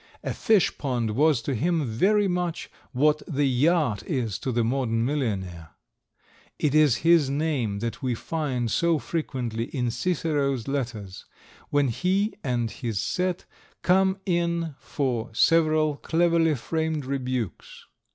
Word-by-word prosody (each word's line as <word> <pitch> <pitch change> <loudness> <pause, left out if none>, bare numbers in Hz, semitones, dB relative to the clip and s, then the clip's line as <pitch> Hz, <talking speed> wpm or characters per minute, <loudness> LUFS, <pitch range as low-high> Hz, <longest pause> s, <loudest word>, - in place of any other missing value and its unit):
A - - -2
fish 215 -6 +2
pond 120 -6 -1
was 140 +1 +2
to 140 - -2
him 160 +5 0
very 195 - +2
much 175 -2 -2 0.2
what 150 +4 +2
the 145 -2 0
yacht 140 -2 +2
is 120 - -2
to 130 - -2
the 120 -1 +1
modern 115 -2 0
millionaire. 95 - -3 0.8
It 145 -3 0
is 150 -5 +5
his 165 -5 +5
name 140 -8 -1
that 115 0 -4
we 125 -3 -1
find 130 -5 -2
so 170 -1 +2
frequently 125 -8 -3
in 125 -3 -2
Cicero's 140 -3 -1
letters, 115 -9 -4 0.4
when 145 -2 +2
he 190 - 0
and 120 -4 -1
his 115 -6 -3
set 180 - -1 0.4
come 190 +1 +3
in 170 -3 0
for 125 -5 -2
several 155 0 +3
cleverly 165 -1 +2
framed 160 +2 -2
rebukes. 130 -6 -4
140 Hz, 130 wpm, -25 LUFS, 120-165 Hz, 0.8 s, is